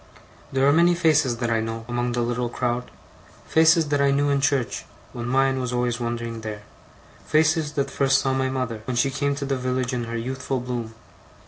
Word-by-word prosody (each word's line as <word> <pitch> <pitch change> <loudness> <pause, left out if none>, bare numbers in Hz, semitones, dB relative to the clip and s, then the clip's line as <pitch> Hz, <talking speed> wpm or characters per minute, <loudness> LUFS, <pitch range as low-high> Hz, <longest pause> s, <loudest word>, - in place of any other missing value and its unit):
There 135 0 +2
are 140 - +5
many 170 +2 +4
faces 155 -7 +2
that 120 -1 -1
I 115 - +2
know, 115 0 -4
among 120 0 -1
the 120 - 0
little 120 0 -1
crowd; 120 0 -2 0.6
faces 160 -1 +4
that 145 -1 +1
I 140 - +4
knew 145 +1 +2
in 140 -1 +1
church, 135 -3 0 0.3
when 120 0 -5
mine 135 +1 +2
was 125 -1 -3
always 125 0 0
wondering 115 -1 -4
there; 105 -1 -6 0.6
faces 155 -1 +2
that 140 -1 -1
first 135 -1 +3
saw 135 -1 0
my 130 0 0
mother, 125 -4 -3
when 130 - -3
she 135 +2 +2
came 140 +1 -1
to 140 0 -4
the 135 0 0
village 130 0 -1
in 120 -1 -2
her 115 0 -4
youthful 130 +2 -3
bloom. 120 -2 -5
130 Hz, 205 wpm, -24 LUFS, 120-140 Hz, 0.6 s, are